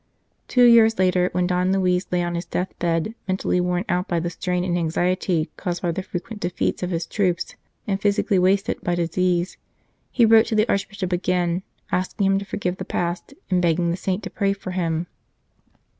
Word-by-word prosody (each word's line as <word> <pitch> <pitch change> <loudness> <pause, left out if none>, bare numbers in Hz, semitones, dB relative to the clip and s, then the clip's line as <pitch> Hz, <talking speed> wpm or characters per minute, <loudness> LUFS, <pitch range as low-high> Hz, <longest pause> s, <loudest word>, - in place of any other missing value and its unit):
Two 250 - +4
years 230 -2 +6
later, 180 -1 +2
when 180 0 +1
Don 180 +1 +1
Luis 185 -1 +1
lay 180 -1 +1
on 175 0 -2
his 170 0 -4
death 180 +2 -2
bed 170 +4 0
mentally 185 -1 0
worn 180 +2 -1
out 180 +1 0
by 170 - 0
the 170 +1 -3
strain 180 +1 -2
and 180 -1 0
anxiety 175 0 0
caused 175 0 -3
by 175 - +1
the 180 - -3
frequent 190 +4 -6
defeats 175 0 -1
of 180 - -2
his 165 -2 -2
troops, 180 -5 -1 0.3
and 195 -1 -2
physically 200 -1 +2
wasted 195 +4 +1
by 175 - 0
disease, 175 +1 0 0.5
he 235 - +4
wrote 225 0 +6
to 220 - -1
the 215 +1 +3
Archbishop 195 -2 -2
again, 180 0 0 0.3
asking 185 +2 0
him 195 0 +3
to 200 - -7
forgive 185 -2 -3
the - - -5
past, 175 +9 -3 0.2
and 180 -1 +3
begging 170 0 +2
the - - 0
saint 190 +2 -2
to 195 - -6
pray 200 -2 +1
for 195 -1 -7
him. 170 -2 -1
180 Hz, 195 wpm, -23 LUFS, 175-195 Hz, 0.5 s, years